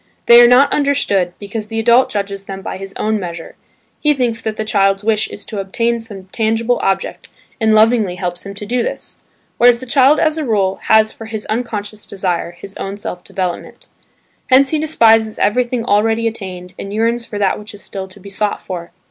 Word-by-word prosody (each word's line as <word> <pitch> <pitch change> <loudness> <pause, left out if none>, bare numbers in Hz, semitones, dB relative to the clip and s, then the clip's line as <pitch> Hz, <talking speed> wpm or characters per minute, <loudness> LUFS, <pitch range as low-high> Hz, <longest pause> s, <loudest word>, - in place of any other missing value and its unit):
They 235 0 +9
are 240 - +8
not 250 +3 +5
understood, 205 -11 +1
because 210 +1 -6
the 225 +1 -3
adult 235 +3 +4
judges 200 -1 -4
them 195 0 -7
by - - -5
his 195 0 -8
own 215 0 0
measure: 170 -3 -7 0.4
he 300 -1 +2
thinks 235 -3 -1
that 220 -1 -4
the 220 - -2
child's 195 -1 +2
wish 215 0 +1
is 205 - -9
to 210 - -5
obtain 230 +5 -1
some 210 -4 -7
tangible 225 +2 0
object, 195 - -2 0.3
and 220 -1 +2
lovingly 215 -4 +3
helps 175 -1 -2
him 200 0 -8
to 210 - -6
do 245 +3 0
this: - - -3 0.4
whereas 240 0 +6
the 260 - -8
child 270 +3 +4
as 315 0 +1
a - - -2
rule 200 -7 0
has 220 0 +4
for 225 - -10
his 220 -1 -5
unconscious 215 -2 -4
desire, 185 -4 -1
his 190 +3 -11
own 195 +1 -5
self 180 -3 -6
development. 180 -2 -5 0.6
Hence 265 +1 +5
he 310 - 0
despises 225 -8 +3
everything 240 +2 0
already 225 +2 +2
attained, 185 -5 -6
and 195 - -6
yearns 230 +3 0
for 210 - -7
that 200 -2 +1
which 210 +1 -9
is 205 - -10
still 190 -1 -6
to 190 +2 -15
be 200 +1 -11
sought 205 +1 -1
for. 175 -2 -7
215 Hz, 200 wpm, -17 LUFS, 195-235 Hz, 0.6 s, They